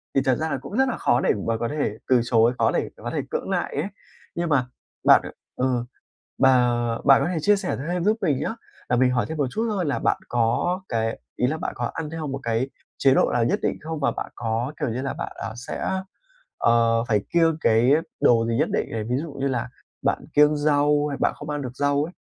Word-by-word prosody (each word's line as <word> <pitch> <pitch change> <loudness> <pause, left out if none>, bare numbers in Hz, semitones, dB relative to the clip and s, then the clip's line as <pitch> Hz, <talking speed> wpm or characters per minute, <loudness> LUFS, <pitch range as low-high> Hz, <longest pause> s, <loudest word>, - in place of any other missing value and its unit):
thì 135 - +4
thật 130 -2 +3
ra 160 +3 -2
là 140 - -1
cũng 190 - -6
rất 265 0 +3
là 235 - -3
khó 125 - +2
để - - +3
mà 115 0 +1
có 115 - -2
thể 130 -6 -2
từ 125 -2 +4
chối, 120 0 +3
khó - - +3
để - - -1
có - - -6
thể - - 0
cưỡng - - -3
lại - - -1
ấy. - - -1 0.5
Nhưng 170 -1 -1
mà 130 -4 +2 0.4
bạn - - +7 0.3
ờ, 125 -2 0 0.5
bà 125 -2 +4 0.3
bạn 135 0 +6
có - - 0
thể 175 - -2
chia 205 +5 +4
sẻ 195 -2 -2
thêm 175 0 -1
giúp 215 +2 +3
mình 155 - +1
nhá, - - -2 0.3
là 125 - +2
mình 125 +1 +4
hỏi 120 -4 0
thêm 160 - -5
một 145 - +2
chút 225 - -1
thôi 195 -4 -1
là 140 - 0
bạn - - +1
có 120 +11 +1
cái 115 -1 -1 0.2
ý 125 - +2
là 155 +4 -1
bạn - - -3
có - - -2
ăn 155 -2 -4
theo 160 -1 -4
một 135 -1 -4
cái 115 +3 -1 0.3
chế 135 -1 +4
độ - - +3
nào 120 -1 +2
nhất 120 - +1
định - - -1
không? 160 -1 -5
Và 140 - +2
bạn - - -6
có, 115 +3 -2
kiểu 150 - 0
như 120 +3 -3
là, 140 - -3
bạn, - - -5
ờ, 110 - -5
sẽ, 125 - -4 0.7
ờ, 115 0 +3
phải 105 -2 +3
kiêng 165 -2 +3
cái 115 +1 +4 0.3
đồ 115 -1 +4
gì 115 0 0
nhất - - +2
định - - 0
này, 110 -1 -2
ví 120 +3 -1
dụ 165 -3 -7
như 140 0 -2
là 125 -2 -2 0.3
bạn - - 0
kiêng 150 +1 +5
rau 145 0 +2
hay 140 - -4
bạn - - +2
không 150 0 -8
ăn 145 -1 -2
được 125 -1 -7
rau 145 +1 +1
ấy, 170 - -7
135 Hz, 250 wpm, -24 LUFS, 120-155 Hz, 0.7 s, bạn